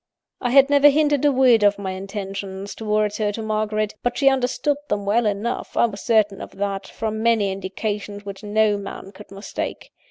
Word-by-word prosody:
"I 245 - 0
had 275 +2 +5
never 285 0 +7
hinted 290 -1 +2
a 290 - +5
word 255 -4 +4
of 205 0 +4
my 195 -2 -4
intentions 195 0 -6
towards 210 -1 -1
her 210 -1 +1
to 225 - -5
Margaret; 215 0 -1
but 245 0 -1
she 275 -1 +5
understood 270 +2 0
them 200 -1 -1
well 220 +3 +2
enough 210 +4 -3
I - - +5
was 210 -3 -5
certain 215 -4 +2
of - - -10
that, 200 -1 -3
from 220 -1 -4
many 220 -4 +2
indications 205 +1 -5
which 200 0 -8
no 210 0 +2
man 195 -1 -8
could 205 +2 -14
mistake. 195 +1 -6
210 Hz, 190 wpm, -22 LUFS, 200-235 Hz, -, never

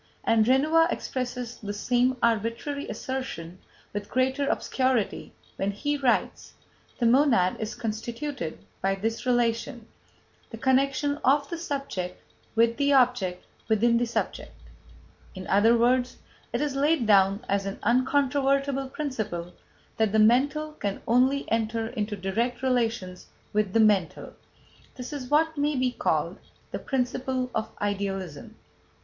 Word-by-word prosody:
And 225 -1 +3
Renouvier 310 +6 +4
expresses 250 -4 -4
the 205 -1 -5
same 250 +4 +1
arbitrary 230 +6 0
assertion 185 -10 -5 0.3
with 205 0 -5
greater 265 +2 +1
obscurity 255 -5 0 0.3
when 195 - 0
he 290 +9 -1
writes: 265 -4 0 0.4
"The 240 - 0
monad 235 -7 +4
is 220 +1 -4
constituted 230 - -5 0.2
by 195 0 +1
this 225 +5 -3
relation: 240 0 0 0.6
the 225 - -8
connection 275 +3 +1
of 280 +2 +3
the 340 - -2
subject 275 - -4 0.4
with 230 +1 +3
the 285 0 +2
object 245 -9 +2 0.2
within 230 +2 +3
the 240 - 0
subject." 235 - -4 0.8
In 185 0 -7
other 220 +5 +4
words, 250 +1 +2 0.3
it - - -1
is 295 -2 -1
laid 290 -1 +2
down 200 +1 +4
as 200 0 0
an 195 - -4
uncontrovertible 275 +2 +1
principle 215 - -4 0.4
that 220 -2 +2
"the - - +3
mental 275 +8 +3
can 200 -10 -4
only 260 +4 +3
enter 225 0 0
into 210 -3 -3
direct 230 +6 -2
relations 230 -8 -1 0.3
with 210 -2 +1
the 225 - +3
mental." 205 -6 +2 0.6
That 255 +3 -7
is 260 -4 -6
what 315 +1 +2
may 295 +1 +1
be 255 -1 +1
called - - -1 0.3
"the - - -3
principle 255 -1 -2
of 220 0 -2
Idealism." 195 -6 -3
240 Hz, 130 wpm, -26 LUFS, 215-270 Hz, 0.8 s, Renouvier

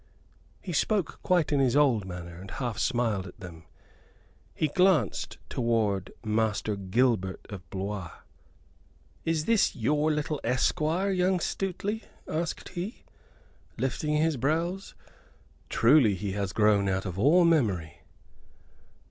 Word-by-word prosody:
He 180 - -5
spoke 200 +2 0
quite 175 -5 +2
in 145 - +2
his 130 -2 +2
old 130 -9 +3
manner, 90 -2 -7
and 95 - -10
half 120 -2 -4
smiled 110 -6 0
at 90 - -13
them. 85 -3 -10 0.9
He 155 - +1
glanced 180 - +2
toward 110 -6 0
Master 110 -1 0
Gilbert 100 -1 0
of 95 -4 -9
Blois. 95 -1 -4 1.2
"Is 160 -1 0
this 230 -3 +3
your 150 +5 +1
little 150 -1 -2
esquire, 155 +9 +1
young 185 0 +2
Stuteley?" 195 +5 -2 0.3
asked 160 +1 -3
he, 190 +6 -6 0.7
lifting 150 +3 -1
his 155 -1 +2
brows. 165 +9 -1 0.7
"Truly 115 -4 +5
he 100 +1 -4
has 100 -1 -2
grown 105 -2 +3
out 95 +1 -1
of 95 -1 -4
all 165 - +5
memory." 105 - +1
125 Hz, 120 wpm, -28 LUFS, 100-160 Hz, 1.2 s, Truly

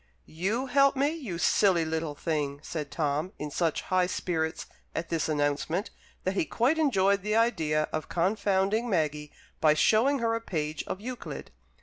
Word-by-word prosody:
"You 200 +11 -2
help 275 +1 +4
me, 275 +2 +2
you 260 - -5
silly 175 -1 +3
little 160 -1 -2
thing!" 145 -2 -2
said 155 -3 -4
Tom, 155 +3 -1
in 150 0 -5
such 165 0 0
high 185 -1 +2
spirits 160 -3 -2 0.3
at 165 - -3
this 165 -1 -1
announcement 150 +6 0 0.3
that 185 - 0
he 195 - +1
quite 255 - +1
enjoyed 200 -9 +3
the 210 +2 -1
idea 165 -10 +2
of 155 - -3
confounding 200 +4 +1
Maggie 150 -5 -1 0.3
by 155 -1 +5
showing 230 - +4
her 230 -2 0
a 230 - -1
page 155 -7 -3
of 190 - -4
Euclid. 225 - -7
180 Hz, 160 wpm, -28 LUFS, 155-220 Hz, 0.3 s, by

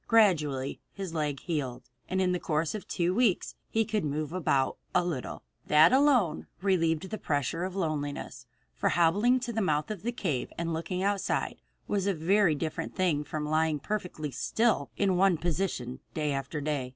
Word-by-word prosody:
Gradually 155 - +3
his 195 -4 -6
leg 150 -4 -1
healed, 135 -7 -4 0.2
and 190 - 0
in 185 -1 +2
the 180 - 0
course 155 -1 0
of 215 - -6
two 175 0 0
weeks 220 -3 +2 0.2
he 225 0 +1
could 215 -2 -1
move 150 +1 -2
about 140 -7 +1 0.2
a 180 - +4
little. 155 -8 -4 0.2
That 155 +8 +6
alone 260 - +3
relieved 180 -2 +1
the 215 - -3
pressure 145 +3 -1
of 185 0 -5
loneliness, 145 -7 -3 0.3
for - - 0
hobbling 205 +10 +3
to 240 -1 -3
the 225 - 0
mouth 155 0 0
of 205 -5 -5
the 240 - -1
cave 165 - -2
and 170 0 -2
looking 180 +3 -2
outside 200 0 -1 0.3
was 200 -1 0
a 200 - +2
very 175 +1 +3
different 155 +1 -4
thing 170 -6 +1
from 150 0 -4
lying 155 0 +2
perfectly 165 -3 -4
still 215 - +1
in 195 -3 +2
one 190 -2 +4
position 155 -7 -2 0.2
day 150 -2 0
after 140 +2 -3
day. 140 -3 -2
170 Hz, 175 wpm, -29 LUFS, 150-195 Hz, 0.3 s, That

